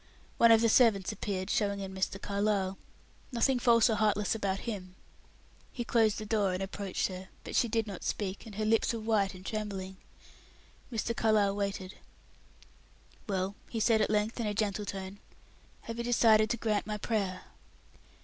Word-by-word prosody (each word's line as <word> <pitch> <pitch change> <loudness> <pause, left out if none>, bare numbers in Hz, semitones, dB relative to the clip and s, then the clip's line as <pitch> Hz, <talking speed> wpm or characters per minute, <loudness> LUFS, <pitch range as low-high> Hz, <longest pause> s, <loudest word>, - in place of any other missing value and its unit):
One 230 0 +7
of 225 0 +6
the 230 - +4
servants 220 -5 +4
appeared, 195 -2 -3
showing 200 -2 0
in 190 -1 -6
Mr. 190 0 -2
Carlyle; 200 -2 -1 0.5
nothing 250 +1 +2
false 235 -2 +5
or 225 - +2
heartless 210 -2 +1
about 195 -3 -2
him. 185 -6 -6 0.8
He 240 - -4
closed 225 -3 +2
the 215 - -5
door, 205 -3 +1
and 190 - -3
approached 195 0 -3
her, 185 0 -8
but - - -6
she 240 - +3
did 225 -1 0
not 200 -4 -7
speak, 200 +2 -3
and 210 - -10
her 215 +1 -1
lips 225 +2 +2
were 230 - -3
white 215 -3 +1
and 185 +1 -12
trembling. 195 -3 -4 0.9
Mr. 230 0 -2
Carlyle 210 -3 +2
waited. 200 -2 -4 1.3
"Well," 190 0 -1 0.2
he 230 - -3
said 220 0 +3
at - - +1
length, 210 +3 0
in 230 - -1
a 205 - -2
gentle 210 -1 -1
tone, 195 0 -6 0.6
"have 230 0 -7
you - - -1
decided 225 -3 +4
to 240 - 0
grant 215 -2 -1
my 210 0 -2
prayer?" 200 -4 -2
210 Hz, 175 wpm, -31 LUFS, 195-225 Hz, 1.3 s, One